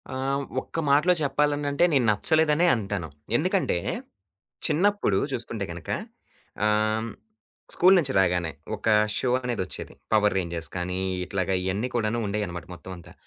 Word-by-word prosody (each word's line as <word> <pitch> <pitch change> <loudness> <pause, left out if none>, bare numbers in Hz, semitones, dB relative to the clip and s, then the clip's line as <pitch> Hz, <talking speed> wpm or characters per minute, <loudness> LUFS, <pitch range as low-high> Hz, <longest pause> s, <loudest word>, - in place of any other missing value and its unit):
ఆహ్, 135 +1 -1 0.2
ఒక్క 165 - -6
మాటలో 150 +6 +5
చెప్పాలనంటే 145 +1 +1
నేను 130 -4 +3
నచ్చలేదనే 155 +8 +3
అంటాను. 100 -6 -3 0.3
ఎందుకంటే - - +1 0.9
చిన్నప్పుడు 200 +7 +2
చూసుకుంటే 115 -5 -2
గనక, 85 -1 -9 0.8
ఆహ్, 110 +1 +1 0.6
స్కూలు 185 +2 +6
నుంచి 140 -5 -1
రాగానే 90 -3 +1 0.2
ఒక 105 - -6 0.3
షో 130 - 0
అనేదొచ్చేది. 110 -7 -4 0.2
'పవర్ 105 -1 +4
రేంజర్స్' 85 -2 -3
కానీ 90 +1 -2 0.3
ఇట్లాగ 95 -1 -2
ఇయన్ని 100 +6 -1
కూడాను 115 0 0
ఉండేయన్నమాట 100 -4 -3
మొత్తమంతా. 90 -1 -10
110 Hz, 120 wpm, -26 LUFS, 95-140 Hz, 0.9 s, స్కూలు